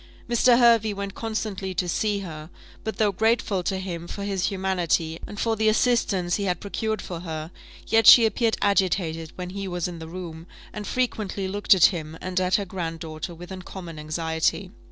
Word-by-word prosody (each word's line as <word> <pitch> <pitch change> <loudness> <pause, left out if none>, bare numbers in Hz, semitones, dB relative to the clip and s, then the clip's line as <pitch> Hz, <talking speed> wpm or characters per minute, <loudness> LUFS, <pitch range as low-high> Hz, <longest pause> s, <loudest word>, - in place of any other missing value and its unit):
Mr. 240 +1 +4
Hervey 230 -3 +5
went 200 0 -4
constantly 210 -4 -4
to 180 +1 0
see 205 +3 0
her; 155 -4 -8 0.3
but, 220 - -4
though 210 -2 +3
grateful 220 -1 +1
to 190 +2 -1
him 175 -3 -5
for 200 - -6
his 195 -2 -1
humanity, 180 -4 0
and 205 - -8
for 225 -1 +1
the 220 0 +3
assistance 215 -6 +2
he 200 - -2
had 180 -2 0
procured 215 0 -3
for 175 -2 -6
her, 160 -1 -6 0.3
yet 225 0 +3
she 235 - +10
appeared 225 +1 +1
agitated 175 -5 +1
when 180 0 -6
he 195 0 -5
was 175 -2 -2
in 175 -2 -7
the 160 - -8
room, 165 -1 -8 0.3
and 210 -1 -6
frequently 215 -6 -1
looked 205 +1 +4
at 180 - +6
him 160 -2 -6
and 185 0 -2
at 185 0 +2
her 200 - 0
grand 170 -3 -4
daughter 160 +2 -6
with 175 +3 -11
uncommon 180 -3 -8
anxiety. 160 +4 -1
190 Hz, 190 wpm, -25 LUFS, 170-210 Hz, 0.3 s, she